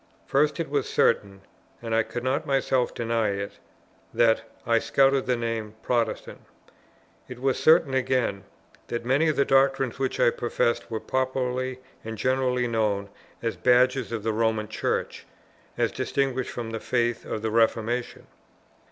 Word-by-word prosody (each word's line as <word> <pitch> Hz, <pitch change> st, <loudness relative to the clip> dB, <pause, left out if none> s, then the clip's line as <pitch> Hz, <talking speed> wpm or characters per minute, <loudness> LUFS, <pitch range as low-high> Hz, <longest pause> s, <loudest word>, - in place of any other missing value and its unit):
First 150 Hz, +3 st, +1 dB
it 165 Hz, -, -1 dB
was 140 Hz, -2 st, -1 dB
certain, 100 Hz, -3 st, +1 dB, 0.4 s
and 115 Hz, -1 st, -4 dB
I 115 Hz, -, +4 dB
could 120 Hz, +2 st, -5 dB
not 140 Hz, +5 st, -1 dB
myself 135 Hz, -2 st, +1 dB
deny 115 Hz, -1 st, 0 dB
it, 100 Hz, 0 st, -6 dB, 0.6 s
that 115 Hz, -1 st, +4 dB, 0.2 s
I 115 Hz, -1 st, +3 dB
scouted 135 Hz, +2 st, +2 dB
the 125 Hz, -, +2 dB
name 115 Hz, -2 st, -3 dB
"Protestant." 120 Hz, -3 st, -1 dB, 0.9 s
It 125 Hz, -1 st, -9 dB
was 135 Hz, 0 st, 0 dB
certain 155 Hz, -3 st, +5 dB
again, 125 Hz, -7 st, 0 dB, 0.4 s
that 120 Hz, 0 st, -4 dB
many 135 Hz, +6 st, +3 dB
of 155 Hz, -, +1 dB
the 140 Hz, -, +2 dB
doctrines 135 Hz, -2 st, +2 dB
which 130 Hz, -1 st, -1 dB
I -, -, +5 dB
professed 120 Hz, 0 st, -1 dB
were 110 Hz, -1 st, -3 dB
popularly 130 Hz, 0 st, -2 dB, 0.2 s
and 110 Hz, 0 st, -6 dB
generally 125 Hz, 0 st, +1 dB
known 105 Hz, -3 st, 0 dB, 0.3 s
as 115 Hz, -1 st, -1 dB
badges 125 Hz, 0 st, +3 dB
of 115 Hz, -3 st, -3 dB
the 110 Hz, 0 st, 0 dB
Roman 110 Hz, -1 st, 0 dB
Church, 110 Hz, -, -3 dB, 0.5 s
as -, -, +1 dB
distinguished 135 Hz, -2 st, -1 dB
from 115 Hz, -2 st, -5 dB
the 115 Hz, -, -3 dB
faith 120 Hz, -1 st, 0 dB
of 110 Hz, -, -5 dB
the 110 Hz, -, -1 dB
Reformation. 115 Hz, +2 st, 0 dB
120 Hz, 150 wpm, -26 LUFS, 115-130 Hz, 0.9 s, certain